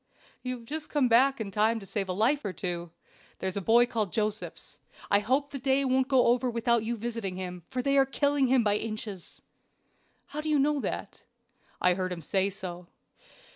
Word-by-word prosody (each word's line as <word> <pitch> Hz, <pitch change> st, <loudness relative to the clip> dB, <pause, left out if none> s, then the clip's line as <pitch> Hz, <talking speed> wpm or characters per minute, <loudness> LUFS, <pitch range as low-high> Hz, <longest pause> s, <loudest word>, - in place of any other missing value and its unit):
"You 255 Hz, 0 st, -3 dB
have 230 Hz, -, -14 dB
just 305 Hz, +4 st, -4 dB
come 285 Hz, -4 st, +2 dB
back 260 Hz, +3 st, +4 dB
in 205 Hz, -3 st, -4 dB
time 220 Hz, +3 st, +2 dB
to 200 Hz, -, -11 dB
save 195 Hz, 0 st, -3 dB
a -, -, 0 dB
life 245 Hz, +9 st, +2 dB
or 200 Hz, -3 st, -3 dB
two. 175 Hz, -2 st, -3 dB, 0.5 s
There -, -, -3 dB
is 185 Hz, -, -2 dB
a 200 Hz, -, -1 dB
boy 235 Hz, +5 st, +5 dB
called 220 Hz, -6 st, -2 dB
Josephs. 215 Hz, -1 st, -3 dB, 0.3 s
I 200 Hz, -, +6 dB
hope 265 Hz, +7 st, 0 dB
the 275 Hz, -, -5 dB
day 270 Hz, +1 st, +2 dB
won't 260 Hz, 0 st, +2 dB
go 265 Hz, -3 st, +4 dB
over 245 Hz, +1 st, +3 dB
without 235 Hz, -1 st, +1 dB
your 235 Hz, +1 st, -2 dB
visiting 225 Hz, -4 st, -4 dB
him, 180 Hz, -1 st, -6 dB
for 255 Hz, -1 st, -2 dB
they 275 Hz, +1 st, +3 dB
are 270 Hz, -, +5 dB
killing 285 Hz, 0 st, +2 dB
him 255 Hz, -1 st, +4 dB
by 205 Hz, -1 st, +2 dB
inches." 215 Hz, -4 st, -6 dB, 0.9 s
"How 300 Hz, -, -2 dB
do 310 Hz, -, -3 dB
you 300 Hz, -, +3 dB
know 290 Hz, +1 st, +2 dB
that?" -, -, -5 dB, 0.6 s
"I 180 Hz, -, +4 dB
heard 185 Hz, 0 st, -2 dB
him 170 Hz, -2 st, -5 dB
say 190 Hz, +4 st, +1 dB
so." 180 Hz, -2 st, -7 dB
230 Hz, 210 wpm, -28 LUFS, 195-265 Hz, 0.9 s, I